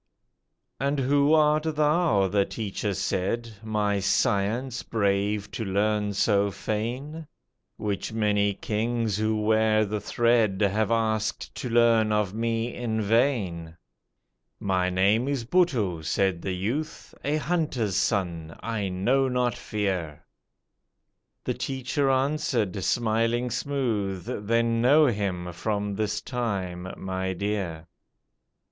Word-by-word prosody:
"And 140 +1 0
who 140 +3 +3
art 155 0 +2
thou," 150 - +3
the 100 +1 +2
teacher 105 -1 -3
said, 115 +7 -2
"My 105 -2 0
science 105 +6 0
brave 100 -1 0
to 110 - -4
learn 105 +1 0
so 100 0 +2
fain? 125 +11 -4 0.5
Which 100 0 -3
many 105 -2 +1
kings 110 0 -1
who 110 0 0
wear 110 0 +3
the 105 0 -3
thread 115 -3 +2
Have 105 +1 +2
asked 110 -2 -1
to 125 - -5
learn 115 -2 +4
of 105 -3 +1
me 115 +1 -1
in 115 -2 -2
vain." 100 -8 0 0.8
"My 95 -2 +1
name 100 +7 +2
is 140 -5 -1
Buttoo," 120 - +1
said 85 +2 0
the 95 - -2
youth, 125 +12 -4
"A 145 +2 +1
hunter's 150 - -1
son, 85 -6 -1
I 110 -4 -2
know 125 +9 +2
not 125 -1 +1
Fear;" 95 -8 -3 1.2
The - - -1
teacher 135 +1 -1
answered, 130 -8 0
smiling 115 +2 +1
smooth, 110 -10 -2 0.2
"Then 115 0 +2
know 145 +6 +6
him 95 -7 -1
from 105 +2 -2
this 105 +1 -2
time, 95 -8 -3
my 95 0 -3
dear." 95 -5 -3
110 Hz, 115 wpm, -26 LUFS, 100-120 Hz, 1.2 s, know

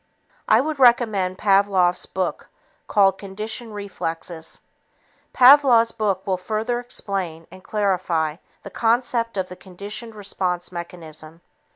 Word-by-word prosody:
I 220 - +5
would 305 0 -3
recommend 220 -7 +3
Pavlov's 195 -3 +2
book 185 -1 -3 0.4
called 195 -2 +3
Conditioned 215 +3 -5
Reflexes. 165 -4 -5 0.7
Pavlov's 250 -3 +6
book 200 -3 -1
will 190 -2 0
further 215 +6 -2
explain 195 -9 -4
and 185 0 -13
clarify 180 -7 0 0.3
the - - -9
concept 230 -1 0
of 185 -1 -1
the 180 - -9
conditioned 200 +5 -7
response 180 -4 -3
mechanism. 165 -2 -8
195 Hz, 110 wpm, -22 LUFS, 180-225 Hz, 0.7 s, Pavlov's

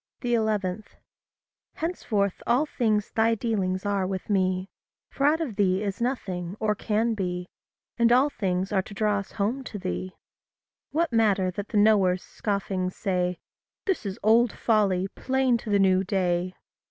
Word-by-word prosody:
11. 215 -4 0 0.9
Henceforth 215 - -1
all 245 +6 +3
things 215 -8 0
thy 225 +1 +2
dealings 195 -5 -1
are 200 -2 0
with 190 +2 -4
me 185 -1 +1 0.4
For 280 - +1
out 310 +2 +3
of 265 -11 -4
thee 190 -1 +2
is 200 +1 -3
nothing, 190 -7 -3
or 215 -1 +1
can 220 +2 0
be, 180 -3 -3 0.5
And 235 0 +4
all 260 +4 +4
things 185 -4 -1
are 195 -2 +2
to 200 - -11
draw 210 0 +1
us 195 - -9
home 225 +6 -1
to 210 - -6
thee. 185 -1 -4 0.8
What 330 -3 0
matter 200 -5 +3
that 200 +3 -5
the 215 - -2
knowers 200 -4 +4
scoffing 195 -3 -2
say, 180 -2 -1 0.5
"This 385 - 0
is 195 +1 -4
old 230 +2 +5
folly, 195 -5 +1
plain 260 +2 +1
to 225 - -8
the 205 - +3
new 190 -1 +4
day"? 185 -2 0
205 Hz, 155 wpm, -26 LUFS, 185-230 Hz, 0.9 s, old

